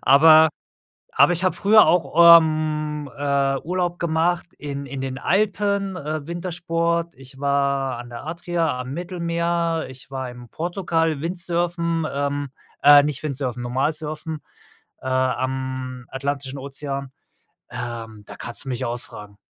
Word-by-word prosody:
Aber 155 Hz, +4 st, +7 dB, 0.7 s
aber 140 Hz, +5 st, +6 dB
ich 175 Hz, +2 st, +1 dB
habe 185 Hz, -, +2 dB
früher 210 Hz, -2 st, +6 dB
auch, 170 Hz, 0 st, +7 dB
ähm, 155 Hz, -2 st, -2 dB
äh, 140 Hz, -1 st, +1 dB
Urlaub 175 Hz, 0 st, -2 dB
gemacht 170 Hz, +1 st, 0 dB
in 140 Hz, -1 st, -5 dB
in 135 Hz, 0 st, -6 dB
den 130 Hz, 0 st, -4 dB
Alpen, 200 Hz, +1 st, 0 dB
äh, 155 Hz, -2 st, -4 dB
Wintersport. 170 Hz, -1 st, -2 dB
Ich 135 Hz, +1 st, -14 dB
war 140 Hz, -2 st, 0 dB
an 120 Hz, 0 st, -9 dB
der 120 Hz, +3 st, -8 dB
Adria 170 Hz, -4 st, -1 dB
am 125 Hz, -, -7 dB
Mittelmeer. 170 Hz, -1 st, -1 dB
Ich 130 Hz, +1 st, -13 dB
war 130 Hz, -2 st, -4 dB
im 125 Hz, -1 st, -12 dB
Portugal, 165 Hz, -3 st, -1 dB
Windsurfen, 170 Hz, -1 st, -1 dB
ähm, 145 Hz, 0 st, -2 dB, 0.3 s
äh, 145 Hz, 0 st, +9 dB
nicht 150 Hz, 0 st, -3 dB
Windsurfen, 130 Hz, -4 st, -3 dB
normal 135 Hz, +5 st, 0 dB
surfen, 155 Hz, 0 st, -6 dB, 0.6 s
äh, -, -, -8 dB
am 130 Hz, -1 st, -2 dB
Atlantischen 140 Hz, 0 st, -4 dB
Ozean. 140 Hz, 0 st, -5 dB, 0.6 s
Ähm, 115 Hz, -3 st, -6 dB
da -, -, -10 dB
kannst 120 Hz, -, -7 dB
du -, -, -5 dB
mich 125 Hz, -2 st, -2 dB
ausfragen. 105 Hz, -4 st, -6 dB
150 Hz, 135 wpm, -22 LUFS, 130-170 Hz, 0.7 s, äh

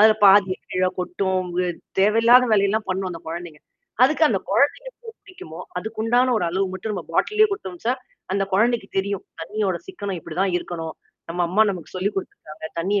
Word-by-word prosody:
அதுல 215 Hz, 0 st, +7 dB
பாதிய 195 Hz, -1 st, +6 dB, 0.2 s
கீழ 185 Hz, 0 st, +2 dB
கொட்டும், 185 Hz, 0 st, -1 dB, 0.2 s
அ -, -, -1 dB, 0.3 s
தேவையில்லாத 230 Hz, +5 st, +6 dB
வேலையெல்லாம் 210 Hz, +1 st, +2 dB
பண்ணும் 190 Hz, 0 st, -1 dB
அந்த 165 Hz, -2 st, -7 dB
குழந்தைங்க. 165 Hz, -2 st, -7 dB, 0.4 s
அதுக்கு 310 Hz, +4 st, +2 dB
அந்த 200 Hz, -, +1 dB
குழந்தைக்கு 280 Hz, +8 st, +4 dB, 0.4 s
எ -, -, -52 dB
குடிக்குமோ, 255 Hz, -, -11 dB, 0.2 s
அதுக்குண்டான 225 Hz, +5 st, +1 dB
ஒரு 210 Hz, -, 0 dB
அளவு 190 Hz, +3 st, 0 dB
மட்டும் 195 Hz, +3 st, -4 dB
நம்ப 185 Hz, -4 st, -4 dB
பாட்டில்லயே 425 Hz, -, +3 dB
குடுத்தோம்ச்சா, 205 Hz, -, -3 dB, 0.4 s
அந்த 195 Hz, 0 st, +1 dB
குழந்தைக்கு 225 Hz, 0 st, +2 dB
தெரியும். 200 Hz, 0 st, -2 dB, 0.2 s
தண்ணியோட 195 Hz, +2 st, -1 dB
சிக்கனம் 200 Hz, -, -5 dB
இப்டிதான் 180 Hz, +4 st, -1 dB
இருக்கணும். 165 Hz, -2 st, -6 dB, 0.4 s
நம்ம 175 Hz, +1 st, -1 dB
அம்மா 200 Hz, +5 st, +4 dB
நமக்கு 175 Hz, -6 st, -7 dB
சொல்லிக் 195 Hz, +3 st, -1 dB
குடுத்துருக்காங்க. 155 Hz, -4 st, -6 dB
தண்ணீய 200 Hz, +4 st, +1 dB
195 Hz, 160 wpm, -23 LUFS, 180-220 Hz, 0.4 s, அதுல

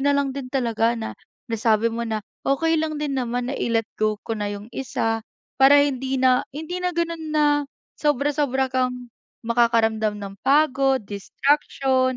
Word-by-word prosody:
na 285 Hz, +1 st, +3 dB
lang 275 Hz, -1 st, 0 dB
din 270 Hz, -2 st, -6 dB
talaga 235 Hz, -3 st, +1 dB
na 220 Hz, -, -4 dB, 0.4 s
nasabi 225 Hz, 0 st, +2 dB
mo 235 Hz, +1 st, -3 dB
na 215 Hz, -2 st, -2 dB, 0.3 s
okey 325 Hz, +4 st, +2 dB
lang 310 Hz, -1 st, -2 dB
din 295 Hz, -2 st, -2 dB
naman 245 Hz, 0 st, -2 dB
na 275 Hz, -, -3 dB
i-let 225 Hz, -1 st, +1 dB, 0.2 s
go 215 Hz, -1 st, +2 dB
ko 225 Hz, -, -3 dB
na 205 Hz, -1 st, -3 dB
yung 205 Hz, +1 st, -7 dB
isa 225 Hz, -4 st, -1 dB, 0.4 s
para 275 Hz, +2 st, +7 dB
hindi 265 Hz, -1 st, -2 dB
na 255 Hz, -1 st, +4 dB
hindi 315 Hz, +6 st, -5 dB
na 360 Hz, 0 st, 0 dB
ganun 335 Hz, -1 st, -2 dB
na 300 Hz, -, +4 dB, 0.6 s
sobra-sobra 285 Hz, -2 st, +1 dB
kang 250 Hz, -1 st, -1 dB, 0.3 s
makakaramdam 225 Hz, -2 st, +2 dB
ng 195 Hz, 0 st, -6 dB
pagod, 270 Hz, -2 st, +3 dB
distraction. 260 Hz, +4 st, 0 dB
255 Hz, 160 wpm, -23 LUFS, 230-280 Hz, 0.6 s, para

